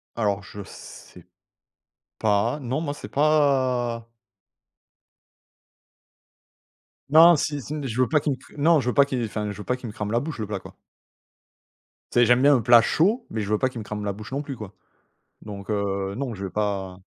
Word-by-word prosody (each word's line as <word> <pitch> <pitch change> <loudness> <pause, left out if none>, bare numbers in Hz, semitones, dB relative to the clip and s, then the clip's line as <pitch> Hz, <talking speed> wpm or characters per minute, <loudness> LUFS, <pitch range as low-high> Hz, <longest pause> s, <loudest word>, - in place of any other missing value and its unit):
Alors 105 -3 0
je 100 +1 -9
sais 90 -1 -13 0.9
pas. 110 +6 +1
Non, 135 +4 -3
moi, 145 -3 -3
c'est - - -9
pas 130 -6 +1 3.0
Non, 165 +3 +8
si 145 0 -2
si 145 - -7
je 125 +1 -1
veux 130 - +3
pas 150 - +3
qu'il 145 -2 -1 0.2
non, 160 +2 +4
je 125 - -1
veux - - -1
pas 140 -1 +5
qu'il 130 -4 -2
enfin, 105 -1 -3
je 100 - -9
veux 105 - -7
pas 125 - -1
qu'il 125 - -8
me 105 - -8
crame 105 -1 -4
la 120 - +2
bouche, 145 -1 -6
le 105 - -3
plat, 100 -2 -4
quoi. - - -14 1.4
Tu - - +2
sais, 120 - +6
j'aime 120 +2 +4
bien 145 0 +6
un 120 - +1
plat 120 +1 +7
chaud, 210 - +1
mais 110 - -3
je 100 - -4
veux 105 - +3
pas 130 - +1
qu'il 125 -2 -7
me 110 - -6
crame 105 0 -5
la 100 - -1
bouche 110 +4 -10
non 140 +2 -2
plus, 140 -2 -6
quoi, 105 -3 -9 0.7
donc 100 -1 -9
heu, 100 -1 -2
non, 130 -3 -3
je 100 -1 -6
vais - - -4
pas 95 -2 -3
120 Hz, 200 wpm, -24 LUFS, 105-140 Hz, 3.0 s, Non